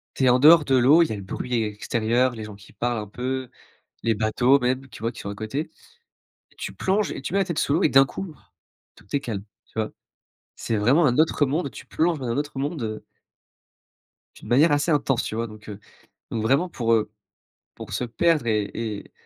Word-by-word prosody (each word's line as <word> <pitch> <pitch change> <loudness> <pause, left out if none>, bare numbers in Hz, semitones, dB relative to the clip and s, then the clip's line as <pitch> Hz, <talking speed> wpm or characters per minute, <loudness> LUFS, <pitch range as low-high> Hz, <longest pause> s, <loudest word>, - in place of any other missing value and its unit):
tu - - -1
es - - +6
en 125 +1 +4
dehors 155 +2 +7
de 135 - +2
l'eau, 140 +7 +6
il 165 - -2
y - - -4
a - - -4
le 100 - -7
bruit 100 +6 -5
extérieur, 115 +4 0
les 110 -2 -7
gens 105 -1 -9
qui 100 - -17
parlent 120 +3 -1
un 105 -1 -5
peu, 130 +4 -4 0.5
les 115 -1 +2
bateaux 110 +5 +3
même 130 +2 -1
tu - - -12
vois 115 - 0
qui 115 - -11
sont 100 - -5
à - - -5
côté. 110 +9 -4 0.9
Tu - - -6
plonges 195 +1 0
et - - -6
tu 140 - -5
mets 200 - +3
la 195 - +2
tête 170 -3 -2
sous 140 - +1
l'eau 170 +5 +2
et - - +4
d'un 135 0 +6
coup, 170 +4 -7 0.6
tout - - -19
est - - +2
calme, 110 -8 -4 0.2
tu - - -31
vois? 110 -1 -2 0.6
C'est 115 - -2
vraiment 130 +11 +4
un 125 0 +2
autre 155 -1 +3
monde, 145 +2 -1
tu - - -11
plonges 165 -1 0
dans 130 - -4
un 120 +3 -1
autre 145 -1 -3
monde, 145 0 -3
heu 110 -1 -5 1.3
d'une - - -12
manière 145 +6 +5
assez 145 +3 +1
intense, 140 -5 +1
tu - - -4
vois? 115 +1 -2
Donc 110 -1 -13
heu, 105 0 -8 0.5
donc 110 -2 -2
vraiment 140 +10 +2
pour, 115 -7 -1
heu, 110 -2 0 0.6
pour - - -10
se - - -1
perdre 145 +4 +1
et 105 -3 0
et 110 -3 -5
125 Hz, 225 wpm, -24 LUFS, 110-145 Hz, 1.3 s, dehors